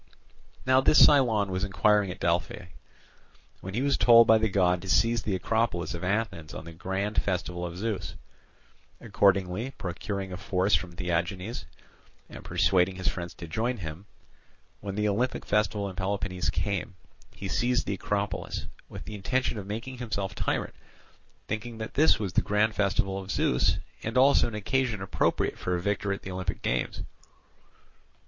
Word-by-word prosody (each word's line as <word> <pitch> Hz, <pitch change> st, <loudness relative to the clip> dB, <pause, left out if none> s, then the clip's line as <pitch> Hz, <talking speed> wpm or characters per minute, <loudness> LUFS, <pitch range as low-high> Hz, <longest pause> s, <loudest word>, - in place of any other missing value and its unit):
Now 130 Hz, +1 st, +5 dB
this 145 Hz, -, +4 dB
Cylon 115 Hz, -9 st, +4 dB
was 95 Hz, +1 st, -2 dB
inquiring 105 Hz, +1 st, +2 dB
at 90 Hz, -, -7 dB
Delphi; 85 Hz, +1 st, -1 dB, 0.9 s
when 95 Hz, +1 st, -7 dB
he 125 Hz, -, 0 dB
was 140 Hz, 0 st, +1 dB
told 115 Hz, -1 st, +8 dB
by 110 Hz, -1 st, +6 dB
the 110 Hz, 0 st, +1 dB
god 90 Hz, -2 st, +2 dB
to 95 Hz, -, -8 dB
seize 115 Hz, +3 st, +3 dB
the 100 Hz, -2 st, -1 dB
Acropolis 110 Hz, -2 st, 0 dB
of 85 Hz, +1 st, -6 dB
Athens 95 Hz, -5 st, -2 dB
on -, -, -7 dB
the 85 Hz, -, -9 dB
grand 95 Hz, +5 st, -1 dB
festival 90 Hz, -2 st, -2 dB
of 85 Hz, 0 st, -5 dB
Zeus. 95 Hz, -, -3 dB, 0.8 s
Accordingly, 100 Hz, +5 st, +1 dB
procuring 95 Hz, +2 st, -4 dB
a -, -, -5 dB
force 95 Hz, +1 st, 0 dB
from 85 Hz, -2 st, +1 dB
Theagenes 90 Hz, +5 st, -2 dB, 0.7 s
and -, -, -10 dB
persuading 95 Hz, -1 st, +2 dB
his 90 Hz, -3 st, -1 dB
friends 85 Hz, +1 st, -6 dB
to 85 Hz, -, -8 dB
join 115 Hz, +9 st, -1 dB
him, 85 Hz, +1 st, -7 dB, 0.7 s
when 100 Hz, -1 st, -5 dB
the 105 Hz, 0 st, +1 dB
Olympic 120 Hz, +5 st, -1 dB
festival 105 Hz, -1 st, +1 dB
in 95 Hz, -, -7 dB
Peloponnese 95 Hz, -1 st, -2 dB
came, 100 Hz, -2 st, -2 dB, 0.4 s
he 100 Hz, -, -6 dB
seized 120 Hz, +5 st, +1 dB
the -, -, -1 dB
Acropolis, 100 Hz, +1 st, -3 dB, 0.2 s
with -, -, -9 dB
the 105 Hz, -, -7 dB
intention 115 Hz, +3 st, -1 dB
of 95 Hz, -, -8 dB
making 115 Hz, +5 st, -5 dB
himself 105 Hz, -5 st, -3 dB
tyrant, -, -, -2 dB, 0.7 s
thinking 110 Hz, +2 st, -4 dB
that 110 Hz, 0 st, -6 dB
this 155 Hz, +3 st, +5 dB
was 100 Hz, -4 st, -4 dB
the -, -, +4 dB
grand 105 Hz, +1 st, +1 dB
festival 95 Hz, -1 st, 0 dB
of 95 Hz, 0 st, -9 dB
Zeus, 60 Hz, -, +2 dB, 0.2 s
and 110 Hz, +3 st, -3 dB
also 135 Hz, +2 st, +5 dB
an 115 Hz, -, -6 dB
occasion 115 Hz, +1 st, 0 dB
appropriate 95 Hz, 0 st, 0 dB
for 90 Hz, -, -1 dB
a -, -, -1 dB
victor 100 Hz, +2 st, -1 dB
at 100 Hz, -, -4 dB
the 95 Hz, -, -6 dB
Olympic 95 Hz, 0 st, -4 dB
games. 60 Hz, 0 st, -1 dB
100 Hz, 165 wpm, -28 LUFS, 90-110 Hz, 0.9 s, told